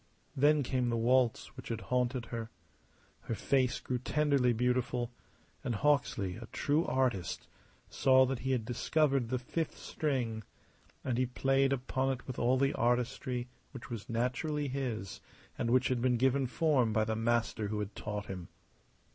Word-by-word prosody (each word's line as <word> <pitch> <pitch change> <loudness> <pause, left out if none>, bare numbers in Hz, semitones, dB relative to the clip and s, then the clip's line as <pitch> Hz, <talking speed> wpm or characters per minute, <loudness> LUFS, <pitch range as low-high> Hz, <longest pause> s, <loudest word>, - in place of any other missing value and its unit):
Then 145 +2 +4
came 125 -1 0
the 115 - 0
waltz 125 +2 +2
which 130 - -9
had 115 -1 -3
haunted 125 -1 +1
her. 115 -1 -4 0.7
Her 115 - -4
face 130 +1 +1
grew 125 -1 -2
tenderly 140 -1 +2
beautiful; 125 0 0 0.5
and 120 - -1
Hawksley, 110 -8 +1
a 115 0 -9
true 150 +6 +1
artist, 125 -9 0 0.4
saw 130 -1 +5
that 130 -1 -2
he 130 - -2
had 120 -4 0
discovered 135 +1 +1
the 130 - 0
fifth 150 +6 -3
string; 125 -7 -2 0.6
and 125 -1 -1
he 130 - +2
played 135 +2 +2
upon 130 0 0
it 125 - -9
with 130 - -5
all 125 +2 +3
the 140 +2 +2
artistry 125 +1 0 0.3
which 130 -2 -9
was 115 -4 -6
naturally 130 +6 -1
his 125 -7 -4 0.3
and 115 - -1
which 130 +1 +3
had 125 -2 0
been 125 -1 +2
given 130 +2 +2
form 125 -3 +2
by 110 - +3
the 110 0 -1
master 115 -1 0
who 105 +1 -3
had 105 0 -3
taught 105 -1 -4
him. 90 -4 -6
125 Hz, 165 wpm, -32 LUFS, 115-135 Hz, 0.7 s, saw